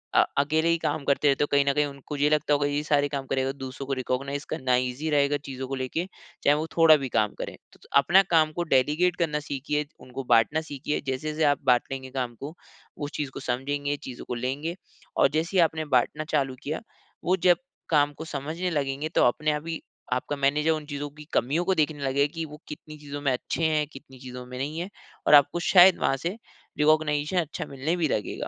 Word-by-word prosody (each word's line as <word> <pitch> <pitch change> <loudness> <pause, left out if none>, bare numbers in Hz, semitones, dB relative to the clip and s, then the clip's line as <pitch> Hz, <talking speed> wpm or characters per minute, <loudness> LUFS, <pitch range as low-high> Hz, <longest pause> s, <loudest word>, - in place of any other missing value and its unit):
अ - - +7
अकेले 155 +3 +2
ही 170 - +3
काम 155 -2 -2
करते 140 +1 +2
रहते 140 0 +3
हो - - 0
कहीं 140 0 +4
न 140 - +2
कहीं 150 +1 +2
उनको 140 +1 -7
ये 145 +1 +3
लगता 150 -1 +2
होगा 145 0 +2
ये 145 0 -1
सारे 145 -1 +2
काम 140 -1 -3
करेगा 135 0 0
दूसरों 135 0 -7
को 135 - -1
रिकॉग्नाइज़ 140 +3 -3
करना 130 -1 +1
ईज़ी 125 +5 -1
रहेगा 145 -1 +2
चीज़ों 130 -1 -5
को 135 - -3
लेके 130 +6 -2 0.4
चाहे 145 - +5
वो 155 - -2
थोड़ा 165 -1 +8
भी 130 - -3
काम 105 -3 +1
करे। - - -4 0.2
त - - -19
त - - -18
अपना 175 +8 +6
काम 155 -2 +4
को 175 - +1
डेलीगेट 150 +7 +3
करना 160 -4 0
सीखिए 150 +1 -2
उनको 130 +1 -7
बाँटना 120 +7 +3
सीखिए 150 -1 -3
जैसे-जैसे 150 +4 -2
आप 145 - -10
बाँट 125 -2 +4
लेंगे 130 -1 -5
काम 125 -3 -3
को 145 +3 -6 0.4
उस 145 0 -5
चीज़ 145 -2 -2
को - - -6
समझेंगे 140 +3 -2
चीज़ों 125 -1 -8
को 125 - -4
लेंगे 135 +8 -3 0.4
और - - +6
जैसे 170 +4 -1
ही - - +7
आपने 160 -1 -1
बाँटना 150 +5 +1
चालू 135 -3 0
किया 155 +6 -3 0.4
वो 180 - +3
जब 175 - +6 0.3
काम 145 -2 +3
को 160 +3 -8
समझने 160 +6 -3
लगेंगे 145 -1 -2
तो - - +5
अपने 150 +5 +2
आप 150 +2 -4
ही 165 -1 -4 0.3
आपका 130 +3 -2
मैनेजर 145 +3 +2
उन 155 -1 -2
चीज़ों 145 0 -5
की 150 - -10
कमियों 155 +8 +1
को 190 0 +2
देखने 150 -2 0
लगेगा 140 +1 +2
कि 165 -1 -3
वो 150 0 -12
कितनी 155 0 -9
चीज़ों 145 -1 -7
में 140 -2 +1
अच्छे 125 +6 -3
हैं 155 -1 +2
कितनी 135 -1 -13
चीज़ों 125 -1 -8
में 125 0 -8
नहीं 145 +5 -3
है 180 +3 -4 0.4
और - - +5
आपको 145 +4 +5
शायद 185 -1 +8
वहाँ 135 - +1
से 185 +5 -2 0.4
रिकॉग्निशन 150 +2 +2
अच्छा 160 -3 -3
मिलने 140 +5 -1
भी 165 -3 +1
लगेगा। 105 -7 -2
145 Hz, 220 wpm, -26 LUFS, 135-155 Hz, 0.4 s, थोड़ा